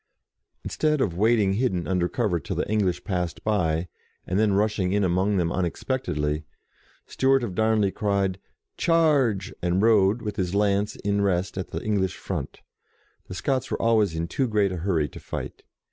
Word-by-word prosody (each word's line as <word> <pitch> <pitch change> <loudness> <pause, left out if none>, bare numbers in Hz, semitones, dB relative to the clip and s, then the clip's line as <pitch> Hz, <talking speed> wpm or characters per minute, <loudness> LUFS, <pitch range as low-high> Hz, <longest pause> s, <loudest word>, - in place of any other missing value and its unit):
Instead 150 -1 0
of 95 -10 0
waiting 105 0 +3
hidden 100 -6 0
under 90 -2 0
cover 105 -8 0
till 70 - -5
the - - -1
English 100 -5 0
passed 90 -5 -3
by, 90 -5 0 0.4
and 95 +2 -1
then 110 -1 +3
rush 105 +2 +1
ing 95 +1 +1
among 95 +3 +1
them 85 -2 +1
unexpectedly, 80 - -2 0.6
Stewart 135 -1 +2
of 105 -6 -3
Darnley 110 -1 +2
cried, 100 -2 -1 0.2
" - - -56
Charge! 145 - +2
" - - -43
and 90 +1 +1
rode, 110 0 +3
with 105 -2 -4
his 95 -1 -1
lance 100 0 +1
in 100 0 -1
rest 95 -2 0
at 95 - -4
the - - -5
English 100 -4 0
front. - - -5 0.7
The 90 - -7
Scots 130 +5 -1
were - - -2
always 110 -6 +2
in 80 +1 -2
too 130 +8 -1
great 105 -3 +1
a 90 - -3
hurry 85 -4 0
to - - -11
fight. - - -6
100 Hz, 175 wpm, -25 LUFS, 90-110 Hz, 0.7 s, waiting